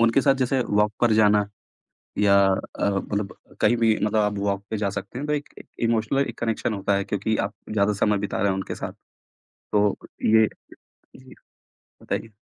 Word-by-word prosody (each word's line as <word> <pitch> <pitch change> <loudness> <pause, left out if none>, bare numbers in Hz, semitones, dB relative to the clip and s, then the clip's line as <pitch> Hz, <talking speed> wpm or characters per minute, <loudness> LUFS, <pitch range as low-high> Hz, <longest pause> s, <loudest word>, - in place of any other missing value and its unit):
उनके 115 +3 +4
साथ 135 -1 +4
जैसे 130 0 0
वॉक 105 +1 +2
पर 120 -2 +4
जाना 105 -1 +4 0.7
या 100 -1 +5
अ, 95 -1 -1
मतलब 100 0 -3 0.2
कहीं 120 +3 +4
भी 115 -2 +3
मतलब 105 +1 +1
आप 105 -1 0
वॉक 100 0 -1
पर 110 - -1
जा 100 -2 -1
सकते 100 +5 -6
हैं 145 - -4
तो 150 - -1
एक 145 -1 -2
ए - - -10 0.2
इमोशनल 115 +2 +1
एक 115 - -8
कनेक्शन 115 -1 -1
होता 100 0 0
है 100 - -1
क्योंकि 105 +2 -1
आप - - -24 0.2
ज़्यादा 105 -1 +2
समय 105 -1 +2
बिता 100 - -3
रहे 100 - +2
हैं 95 - +1
उनके 95 - -4
साथ। - - -6 0.8
तो 105 -1 +3 0.3
ये 110 0 +5 0.7
जी, 130 0 -15 0.7
बताइए। 115 - -3
105 Hz, 190 wpm, -24 LUFS, 100-115 Hz, 0.8 s, या